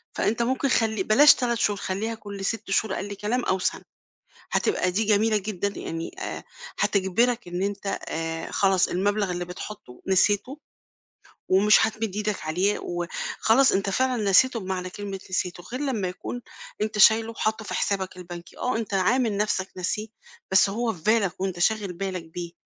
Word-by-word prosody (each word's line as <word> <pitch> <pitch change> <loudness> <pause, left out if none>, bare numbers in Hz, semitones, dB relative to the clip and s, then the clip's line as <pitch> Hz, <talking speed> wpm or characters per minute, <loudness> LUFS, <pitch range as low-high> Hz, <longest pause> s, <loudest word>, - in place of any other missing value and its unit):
فأنت 225 +3 0
ممكن 260 +3 0
خلّي 220 -5 +1
بلاش 285 +10 +7
3 240 -2 0
شهور، 205 -2 +1
خلّيها 210 +5 -3
كلّ 200 -2 -7
6 220 -1 -2
شهور 195 0 +2
أقل 205 +1 -4
كلام 210 +5 -2
أو 190 - +1
سَنَة. - - -1 0.7
هتبقى 185 - +1
دي 205 +5 +1
جميلة 215 +1 +3
جدًا 200 -1 -3
يعني، 165 - -5
آآ، 380 - -5 0.4
هتجبِرك 220 +4 +1
إن 175 +1 -4
أنت، 200 0 -2
آآ، 165 0 -4
خلاص 190 -2 +3
المبلَغ 200 +1 0
اللي 175 0 -3
بتحطّه 180 -6 -9
نسيته 205 +8 +2 0.9
ومش 210 +3 +5
هتمِد 220 -2 -4
إيدك 210 -1 -1
عليه، 185 +6 +1
و 175 0 -4 0.3
خلاص 255 +4 +5
أنت 195 0 0
فعلًا 255 +2 +1
نسيته 235 +5 +5
بمعنى 185 -1 -4
كلمة 195 0 -6
نسيته، 180 -1 -2
غير 255 - -3
لما 240 -10 -1
يكون 215 +7 -6 0.4
أنت 215 0 -2
شايله 220 +2 +6
وحاطّه 220 -1 -2
في - - -5
حسابك 190 -2 -1
البنكي. 175 -1 -10
آه، 250 - -1
أنت 220 -3 -3
عامل 220 +3 +2
نَفسك 200 -2 0
ناسيه، 200 +4 -2 0.4
بس 190 +1 +5
هو 230 +2 -1
في 170 - -13
بالك 210 -3 +1
وأنت 190 -2 -2
شاغل 205 +1 +1
بالك 185 0 -4
بيه، 170 +1 -7
200 Hz, 165 wpm, -25 LUFS, 185-220 Hz, 0.9 s, بلاش